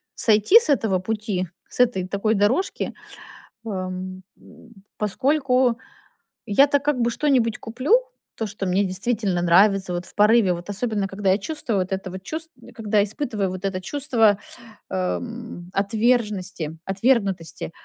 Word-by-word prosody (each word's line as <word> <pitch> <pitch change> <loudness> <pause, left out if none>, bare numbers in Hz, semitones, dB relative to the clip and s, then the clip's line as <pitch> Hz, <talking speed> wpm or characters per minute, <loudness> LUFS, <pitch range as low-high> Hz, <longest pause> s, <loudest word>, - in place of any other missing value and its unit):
сойти 220 - +5
с 470 - -1
этого 220 -9 +2
пути, 205 -2 -2 0.2
с - - -9
этой 235 -7 +3
такой 200 +3 0
дорожки, 225 - 0 0.7
эм, 185 -2 -5
м, 230 -1 -18 0.2
поскольку 255 +2 +1 0.7
я-то 280 +7 +4
как 290 -2 0
бы 235 - +2
что-нибудь 245 -4 +1
куплю, 255 - +1 0.4
то, 225 - -3
что 205 -1 -5
мне 185 +2 +2
действительно 195 -1 -1
нравится 190 +2 +4
вот 175 0 -3
в - - -17
порыве, 210 -2 +4
вот 175 +2 -8
особенно 205 -1 -2
когда 195 -1 0
я 195 - +3
чувствую 230 -3 -3
вот 185 +1 -2
это 190 0 -3
вот 185 +1 -8
чувст 320 +7 -6
э, - - -13
когда 210 -2 +1
испытываю 210 -2 -2
вот 185 +1 -6
это 185 -1 -2
чувство, 225 -4 +2 0.5
эм, 190 0 -4
отверженности 205 -5 0
отвергнутости, 195 -6 0
210 Hz, 140 wpm, -23 LUFS, 190-240 Hz, 0.7 s, сойти